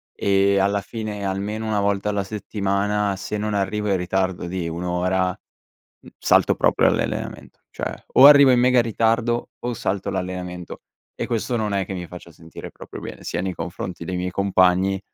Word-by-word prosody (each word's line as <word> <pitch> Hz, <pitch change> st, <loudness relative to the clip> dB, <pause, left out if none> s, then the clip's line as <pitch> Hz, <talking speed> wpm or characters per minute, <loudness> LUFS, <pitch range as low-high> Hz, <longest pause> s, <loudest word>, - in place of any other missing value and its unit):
e, 100 Hz, 0 st, +2 dB
alla 100 Hz, +1 st, +2 dB
fine, 105 Hz, -2 st, -5 dB
almeno 100 Hz, +3 st, -3 dB
1 105 Hz, -2 st, 0 dB
volta 100 Hz, 0 st, 0 dB
alla 100 Hz, -1 st, 0 dB
settimana, 100 Hz, 0 st, -1 dB
se 105 Hz, +2 st, -4 dB
non 105 Hz, 0 st, -2 dB
arrivo 105 Hz, +1 st, -1 dB
in 95 Hz, -, +2 dB
ritardo 95 Hz, 0 st, -1 dB
di 85 Hz, -2 st, -3 dB
1 85 Hz, +2 st, -5 dB
ora, 90 Hz, +1 st, 0 dB, 0.7 s
uhm, -, -, -13 dB
salto -, -, +3 dB
proprio -, -, +3 dB
l'allenamento. -, -, -3 dB
Cioè, -, -, -4 dB, 0.2 s
o 130 Hz, -, +8 dB
arrivo 140 Hz, -1 st, +9 dB
in 125 Hz, -1 st, +5 dB
mega 125 Hz, 0 st, +5 dB
ritardo 115 Hz, +1 st, 0 dB
o 120 Hz, 0 st, -3 dB
salto 100 Hz, -4 st, -2 dB
l'allenamento. 90 Hz, -1 st, -5 dB, 0.3 s
E -, -, -4 dB
questo 120 Hz, +1 st, -1 dB
non 105 Hz, -3 st, -1 dB
è 95 Hz, -1 st, 0 dB
che -, -, -6 dB
mi 90 Hz, -2 st, -6 dB
faccia 85 Hz, -1 st, -11 dB
sentire 80 Hz, +1 st, -11 dB
proprio -, -, -10 dB
bene, -, -, -9 dB
sia 85 Hz, -, -3 dB
nei 95 Hz, 0 st, -2 dB
confronti 85 Hz, +1 st, -6 dB
dei 90 Hz, -, -3 dB
miei 90 Hz, 0 st, -2 dB
compagni, 95 Hz, 0 st, +2 dB
100 Hz, 180 wpm, -22 LUFS, 90-105 Hz, 0.7 s, arrivo